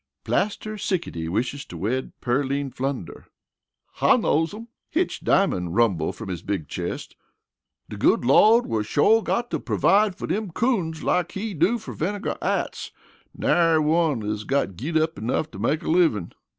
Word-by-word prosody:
"Plaster 215 +1 -1
Sickety 125 - -2
wishes 125 +9 -2
to 85 - -9
wed 120 +9 -2
Pearline 135 +2 -1
Flunder." 130 -8 -5 0.7
"I - - +5
knows 160 +2 +1
'em," 225 +3 -9 0.2
Hitch 345 +3 -1
Diamond 90 - +1
rumbled 95 -9 +2
from 115 -4 -8
his 90 -3 -4
big 95 -6 -3
chest. - - -5 0.7
"De - - -8
good - - +3
Lawd 215 - +6
will 110 -1 -1
shore 145 - +3
got 240 +2 -2
to - - -1
pervide 205 -1 +2
fer - - -5
dem 210 -1 -2
coons 180 -9 0
like 180 -1 0
He 205 +2 -4
do 180 +9 +2
fer 225 - -8
Vinegar 200 +5 -3
Atts - - -2 0.5
nary 165 -2 +3
one 155 -5 +2
is 105 0 -3
got 135 -7 -1
git 155 - -2
up 160 +1 0
enough 125 +7 -1
to 95 - -9
make 140 +9 0
a - - -6
livin'." 160 - +2
155 Hz, 165 wpm, -24 LUFS, -, 0.7 s, Lawd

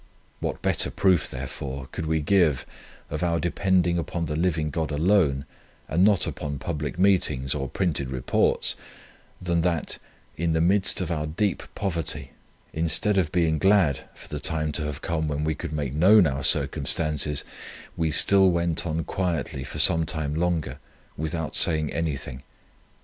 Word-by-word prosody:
What - - -4
better - - +2
proof, 95 -4 +2
therefore, 65 +1 -6
could 80 - -5
we 80 0 0
give 80 -4 +2 0.5
of 75 - -3
our 85 -2 +1
depending 90 0 +1
upon 85 0 -3
the 75 -1 -3
living 80 -2 0
God 80 0 -2
alone, 75 -3 +2 0.4
and 85 +4 +2
not 100 -2 +4
upon 70 -1 -4
public 75 0 -4
meetings 85 -9 +2
or 70 -3 -3
printed 75 -7 -1
Reports, 65 -1 +1 0.6
than 85 -2 0
that, 85 -2 -1 0.4
in 85 0 -1
the 80 - +1
midst 95 +4 +2
of 90 -2 -3
our 75 -2 -2
deep 95 +6 -1
poverty, 80 -8 -2 0.4
instead 85 +5 +2
of 80 -5 -1
being 80 -3 +1
glad 95 -8 +3
for - - -13
the - - -5
time 80 -1 -1
to 75 0 -1
have 75 0 -6
come 80 -2 -1
when 75 0 -2
we 80 0 0
could 80 +1 -6
make 75 -4 -3
known 95 +6 +6
our 70 -2 -2
circumstances, 75 -1 +1 0.5
we 80 -1 0
still 95 +5 +5
went 85 -1 0
on 80 0 -2
quietly 80 -7 -3
for - - -7
some 80 -1 +5
time 75 -2 -3
longer, 80 -5 -1 0.4
without 80 0 -4
saying 80 -2 +3
anything. 70 -5 -4
80 Hz, 160 wpm, -25 LUFS, 75-85 Hz, 0.6 s, known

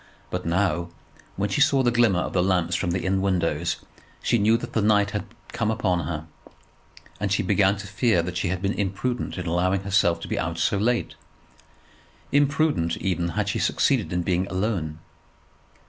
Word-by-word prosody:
But 90 -1 -3
now, 85 -1 0 0.5
when 100 +2 -1
she 150 - +1
saw 140 -2 +4
the 120 - +3
glimmer 115 -7 +3
of - - -4
the 90 - +2
lamps 90 -2 +1
from 85 - -1
the 90 +2 -1
inn 95 0 +1
windows, 85 -4 0 0.5
she 120 - +2
knew 110 +3 +4
that - - -8
the 110 - +1
night 105 -1 +3
had 105 - -3 0.2
come 115 -2 -1
upon 95 -6 0
her, 80 -2 -4 0.9
and - - -1
she - - +2
began 100 0 +3
to 100 - -7
fear 100 -2 +1
that 90 +1 -5
she 90 +1 -1
had 90 +2 -2
been 100 +1 +1
imprudent 105 +6 -2
in 90 - -4
allowing 90 +3 +1
herself 95 -3 +2
to - - -6
be - - -2
out 80 +1 -2
so 95 +4 +1
late, 120 +3 0 1.2
imprudent, 140 - +2
even 85 -2 -1
had 105 -1 +1
she - - -1
succeeded - - +1
in 90 0 0
being 90 +1 0
alone. 95 -6 -2
95 Hz, 185 wpm, -24 LUFS, 85-105 Hz, 1.2 s, saw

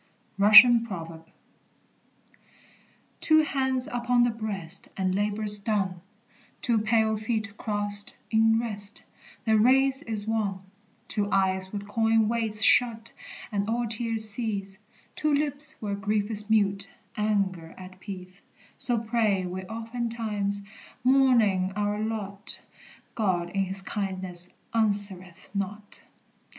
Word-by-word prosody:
RUSSIAN 215 +4 +8
PROVERB. 165 -4 -8 1.9
"Two 315 0 +4
hands 265 -3 -1
upon 245 0 +1
the 240 - +2
breast, 200 -5 -5
And 185 -1 -1
labor's 205 +1 0
done; 195 -4 -2 0.6
Two 235 -3 +2
pale 220 0 +1
feet 220 -1 -3
crossed 205 -2 -1
in 225 0 +3
rest, 210 -2 -3 0.4
The 220 -1 +3
race 265 +4 +3
is 215 -3 -4
won; 210 -4 -2 0.5
Two 205 -1 -2
eyes 190 -1 0
with 205 -1 -6
coin 225 0 +1
weights 220 -2 -1
shut, 230 -2 +3 0.4
And 205 0 -2
all 235 +1 -1
tears 225 -1 +3
cease; 200 -3 -2 0.4
Two 305 -1 0
lips 290 0 +6
where 205 -1 -3
grief 205 +1 -2
is 210 0 -3
mute, 200 -2 +1 0.3
Anger 195 -6 -2
at 185 0 -12
peace:" 185 -1 -9 0.4
So 245 -2 -1
pray 220 -4 0
we 185 +1 -6
oftentimes, 225 -2 -3 0.4
mourning 235 -8 +3
our 205 0 -1
lot; 205 -2 -3 0.5
God 180 -5 -1
in 195 0 -1
his 190 +1 -5
kindness 185 -3 -3 0.2
answereth 200 -5 0
not. 205 +1 -6
210 Hz, 115 wpm, -26 LUFS, 195-225 Hz, 1.9 s, RUSSIAN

